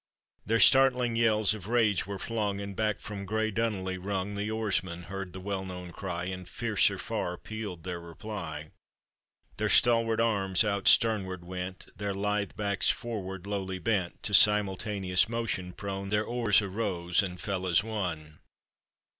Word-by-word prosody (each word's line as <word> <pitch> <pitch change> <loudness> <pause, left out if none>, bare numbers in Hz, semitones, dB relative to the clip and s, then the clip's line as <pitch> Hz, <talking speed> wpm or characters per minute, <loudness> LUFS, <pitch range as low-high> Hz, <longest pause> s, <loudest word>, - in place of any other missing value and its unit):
Their 115 +2 +2
startling 125 -3 +5
yells 110 -2 +3
of 105 -3 -8
rage 110 -6 +2
were 100 -1 -4
flung, 105 -1 -2
And 100 -1 -6
back 110 0 0
from 100 -2 -6
grey 110 +2 -1
Dunolly 95 -4 -2
rung. 95 +1 -3
The 100 +1 -3
oarsmen 95 -5 -1
heard 95 +1 -6
the 95 - -8
well 95 0 -3
known 90 -2 -7
cry, 90 -1 -4
And 95 -1 -6
fiercer - - +1
far 90 0 -3
pealed 105 -6 -7
their 90 -1 -4
reply; 85 0 -7 0.9
Their - - 0
stalwart 115 -2 +5
arms 100 -5 +3
out 100 -2 -1
stern 110 -3 +5
ward 90 -2 -7
went, 90 0 -6
Their 100 -1 -3
lithe 105 0 -1
backs 100 -2 0
forward 95 -5 -3
lowly 95 -2 -3
bent, 95 -2 -2
To 105 - -3
simultaneous 100 -2 +4
motion 105 -6 -3
prone, 100 +1 -5
Their 105 +1 +1
oars 115 -4 +3
arose 95 -4 0
and 90 -3 -5
fell 95 0 -3
as 85 +2 +3
one. 85 -9 -4
100 Hz, 155 wpm, -29 LUFS, 95-110 Hz, 0.9 s, startling